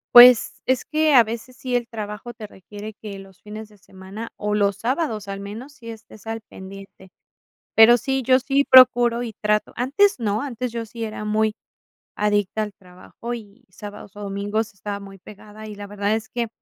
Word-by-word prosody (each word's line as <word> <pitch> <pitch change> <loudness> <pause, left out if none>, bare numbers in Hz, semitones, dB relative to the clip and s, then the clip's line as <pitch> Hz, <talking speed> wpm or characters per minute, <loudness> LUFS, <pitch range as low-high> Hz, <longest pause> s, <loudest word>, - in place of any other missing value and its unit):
Pues, 245 -1 +9
es 260 -1 +1
que 310 -1 +2
a 240 - +9
veces 235 +3 -7
sí 255 -1 -5
el 240 -1 -4
trabajo 215 +2 -6
te 215 -1 -9
requiere 205 +2 -10
que 205 -2 -7
los 195 -1 -14
fines 215 +1 -9
de 210 - -20
semana, 190 +4 -9
o, 210 0 -2
los 200 -1 +2
sábados 230 - -2
al 195 - -4
menos 215 +8 -8
sí 235 -6 -12
estés 225 -1 -12
al 225 0 -4
pendiente. 190 -1 -12 0.7
Pero 225 +2 +9
sí, 265 +3 -1
yo 255 +1 +5
sí 275 +2 +2
procuro 245 -2 +7
y 230 -2 -5
trato. 210 0 +1
Antes 285 +10 +2
no, 215 0 -1
antes 250 -3 -4
yo 230 -1 -4
sí 230 +1 -6
era 215 -1 -5
muy 215 0 +1 0.6
adicta 205 0 0
al 210 -1 -3
trabajo, 185 +6 -9
y 225 +2 -10
sábados, 205 -1 -10
o, 210 - -10
domingos 205 +2 -2
estaba 200 +1 -5
muy 195 -1 -11
pegada, 210 +2 -13
y 210 - -7
la 205 0 -8
verdad 205 +1 -1
es 220 0 -5
que 240 -1 -2
215 Hz, 190 wpm, -22 LUFS, 205-240 Hz, 0.7 s, Pues